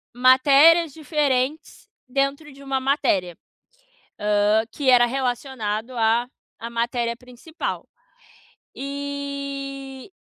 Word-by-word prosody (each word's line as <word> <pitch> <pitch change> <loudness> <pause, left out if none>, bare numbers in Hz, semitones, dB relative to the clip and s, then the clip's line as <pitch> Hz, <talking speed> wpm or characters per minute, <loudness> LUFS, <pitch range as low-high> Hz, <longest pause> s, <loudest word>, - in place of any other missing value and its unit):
matérias 280 +5 +5
diferentes 295 -2 -2 0.2
dentro 275 +3 -2
de 275 - -14
uma 270 -1 -1
matéria, 260 - 0 0.8
hã, 210 +1 +2
que 275 -3 +1
era 240 -1 +6
relacionado 245 -3 -3
a 230 +2 +2 0.3
à 230 - -6
matéria 235 0 -2
principal 250 +6 -7 0.9
e 280 0 -6
265 Hz, 90 wpm, -23 LUFS, 240-280 Hz, 0.9 s, era